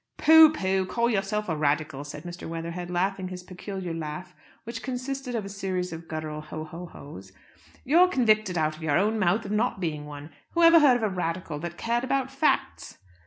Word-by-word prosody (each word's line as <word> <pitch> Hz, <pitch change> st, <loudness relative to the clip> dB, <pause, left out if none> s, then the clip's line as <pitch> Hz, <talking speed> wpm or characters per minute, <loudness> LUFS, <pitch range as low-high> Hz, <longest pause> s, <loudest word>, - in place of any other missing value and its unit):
"Pooh, 320 Hz, 0 st, +8 dB
pooh! 190 Hz, -9 st, 0 dB
Call 235 Hz, +5 st, +1 dB
yourself 210 Hz, 0 st, -1 dB
a 160 Hz, -, -1 dB
Radical!" 150 Hz, -1 st, -1 dB
said 145 Hz, +1 st, -8 dB
Mr. 175 Hz, -1 st, -8 dB
Weatherhead, 170 Hz, +2 st, -5 dB
laughing 185 Hz, +1 st, -1 dB
his 180 Hz, 0 st, -7 dB
peculiar 185 Hz, -1 st, -6 dB
laugh, 160 Hz, +2 st, -6 dB, 0.3 s
which 230 Hz, 0 st, -6 dB
consisted 260 Hz, 0 st, -4 dB
of 215 Hz, -3 st, -2 dB
a -, -, -5 dB
series 185 Hz, -3 st, -3 dB
of 165 Hz, 0 st, -9 dB
guttural 155 Hz, -1 st, -5 dB
ho, 155 Hz, +1 st, -7 dB
ho, 170 Hz, +3 st, -8 dB
ho's. 100 Hz, -, -11 dB, 0.5 s
"You're 340 Hz, +7 st, +6 dB
convicted 215 Hz, -, +2 dB
out 155 Hz, -1 st, 0 dB
of 155 Hz, -, -14 dB
your 155 Hz, -1 st, +1 dB
own 215 Hz, +4 st, +1 dB
mouth 195 Hz, +3 st, +1 dB
of 200 Hz, -, -5 dB
not 215 Hz, 0 st, 0 dB
being 150 Hz, -4 st, -3 dB
one. 145 Hz, +1 st, -9 dB, 0.2 s
Whoever 335 Hz, -1 st, +7 dB
heard 275 Hz, -5 st, +6 dB
of 235 Hz, -, -5 dB
a 215 Hz, -, +2 dB
Radical 170 Hz, -4 st, -3 dB
that 170 Hz, +1 st, -6 dB
cared 235 Hz, +1 st, -1 dB
about 265 Hz, 0 st, -1 dB
facts?" 275 Hz, +3 st, -1 dB
185 Hz, 195 wpm, -26 LUFS, 160-230 Hz, 0.5 s, Pooh